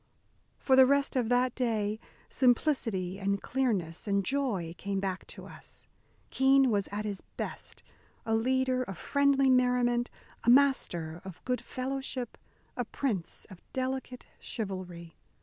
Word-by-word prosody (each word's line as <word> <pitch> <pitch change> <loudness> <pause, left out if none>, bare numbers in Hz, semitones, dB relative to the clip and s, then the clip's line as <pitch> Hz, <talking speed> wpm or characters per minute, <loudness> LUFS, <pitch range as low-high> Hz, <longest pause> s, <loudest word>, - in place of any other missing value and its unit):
For 265 - +3
the 260 0 +8
rest 280 +1 +2
of 245 -3 +1
that 250 0 +3
day 220 -4 -1 0.3
simplicity 230 - +1
and 200 0 0
clearness 215 -11 -1
and 200 -1 +1
joy 220 -12 -1
came 200 0 -2
back 190 -1 -3
to - - -10
us. - - -10 0.4
Keene 265 -1 +4
was 200 -2 +1
at 210 +1 -3
his 200 -2 -4 0.2
best, - - -5 0.4
a 225 - 0
leader 255 +2 +2
of 195 -8 -5
friendly 280 - +3
merriment, 245 -1 +3 0.3
a 235 - +2
master 175 - +3
of 190 -3 -10
good 250 -1 0
fellowship, 260 -1 -3 0.4
a 245 - -1
prince 215 -7 -2
of 185 - -12
delicate 260 -1 -3
chivalry. 180 -5 -6
240 Hz, 135 wpm, -30 LUFS, 195-260 Hz, 0.4 s, the